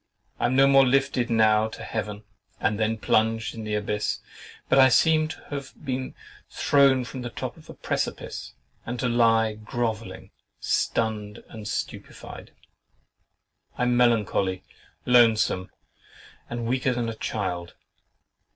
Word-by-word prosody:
I -, -, +2 dB
am 130 Hz, -, 0 dB
no 135 Hz, +1 st, +6 dB
more 135 Hz, 0 st, +6 dB
lifted 135 Hz, -2 st, +1 dB
now 110 Hz, -1 st, +4 dB
to 110 Hz, -, -9 dB
Heaven, 105 Hz, -1 st, -4 dB, 0.4 s
and 105 Hz, 0 st, 0 dB
then 110 Hz, +1 st, 0 dB
plunged 110 Hz, +1 st, +1 dB
in 115 Hz, -, -7 dB
the 105 Hz, 0 st, -2 dB
abyss; 105 Hz, 0 st, -2 dB, 0.5 s
but -, -, +4 dB
I 130 Hz, 0 st, +8 dB
seem 155 Hz, +4 st, +4 dB
to 155 Hz, -, -8 dB
have 140 Hz, -2 st, -5 dB
been 130 Hz, -1 st, -3 dB, 0.3 s
thrown 135 Hz, -3 st, +3 dB
from 130 Hz, +1 st, -7 dB
the 120 Hz, -, -5 dB
top -, -, -6 dB
of -, -, -18 dB
a -, -, -9 dB
precipice, -, -, -4 dB, 0.3 s
and 120 Hz, +1 st, -5 dB
to 125 Hz, -, 0 dB
lie 115 Hz, -2 st, +3 dB
groveling, 110 Hz, -3 st, -4 dB, 0.3 s
stunned, 105 Hz, -2 st, -1 dB
and 110 Hz, -2 st, -8 dB
stupefied. -, -, -6 dB, 1.3 s
I -, -, 0 dB
am 125 Hz, 0 st, +2 dB
melancholy, 105 Hz, -6 st, +2 dB, 0.4 s
lonesome, 115 Hz, -6 st, +4 dB, 0.8 s
and 120 Hz, -1 st, -4 dB
weaker 130 Hz, +1 st, 0 dB
than 120 Hz, -1 st, -1 dB
a 115 Hz, -, -3 dB
child. 90 Hz, -6 st, -4 dB
115 Hz, 140 wpm, -25 LUFS, 105-125 Hz, 1.3 s, I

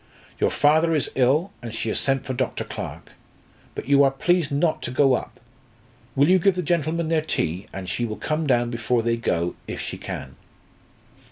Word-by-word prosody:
Your -, -, +3 dB
father 160 Hz, +3 st, +3 dB
is 150 Hz, -, -1 dB
ill, 135 Hz, +8 st, +2 dB
and 120 Hz, -2 st, -6 dB
she 115 Hz, 0 st, -3 dB
has -, -, +1 dB
sent 135 Hz, -1 st, 0 dB
for 130 Hz, -, -3 dB
Dr. 130 Hz, 0 st, -2 dB
Clarke. -, -, -7 dB, 0.6 s
But -, -, -6 dB
you 140 Hz, 0 st, +6 dB
are 135 Hz, -, +5 dB
please 165 Hz, +3 st, +1 dB
not 155 Hz, +2 st, +1 dB
to -, -, -4 dB
go 135 Hz, +1 st, +3 dB
up. -, -, -3 dB, 0.8 s
Will 140 Hz, +2 st, +4 dB
you 185 Hz, +2 st, +5 dB
give 195 Hz, +1 st, +3 dB
the 180 Hz, -, -2 dB
gentlemen 165 Hz, 0 st, 0 dB
their 160 Hz, -1 st, +2 dB
tea, 90 Hz, -, -2 dB
and 95 Hz, -1 st, -7 dB
she 120 Hz, -, -2 dB
will 110 Hz, -2 st, -3 dB
come 155 Hz, 0 st, -2 dB
down 120 Hz, -2 st, +2 dB
before 120 Hz, 0 st, 0 dB
they 115 Hz, 0 st, +1 dB
go, 90 Hz, -7 st, -1 dB
if -, -, -5 dB
she -, -, -5 dB
can." -, -, -7 dB
140 Hz, 195 wpm, -24 LUFS, 120-160 Hz, 0.8 s, you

